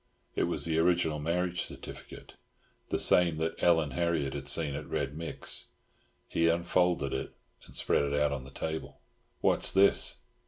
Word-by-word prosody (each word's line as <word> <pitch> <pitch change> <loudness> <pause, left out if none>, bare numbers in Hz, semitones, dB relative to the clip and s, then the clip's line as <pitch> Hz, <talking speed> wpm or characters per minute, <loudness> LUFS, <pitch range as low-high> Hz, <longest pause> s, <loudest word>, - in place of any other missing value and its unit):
It - - +2
was - - -1
the 80 -1 +1
original 85 -2 +2
marriage 90 +3 -1
certificate, - - -9 0.6
the - - 0
same 85 -3 +3
that 80 +1 -1
Ellen 80 -4 +3
Harriott 80 -3 0
had 70 -1 -6
seen 75 0 +1
at - - -6
Red 70 0 -2
Mick's. 80 0 -4 0.6
He 85 - +1
unfolded 85 -3 +1
it 65 - -4 0.3
and - - -13
spread 70 - +2
it 70 +1 0
out 75 0 +2
on 70 -2 -4
the 65 - -11
table. 80 +3 -5 0.4
"What's - - +3
this?" 100 +1 +4
80 Hz, 160 wpm, -30 LUFS, 70-85 Hz, 0.6 s, this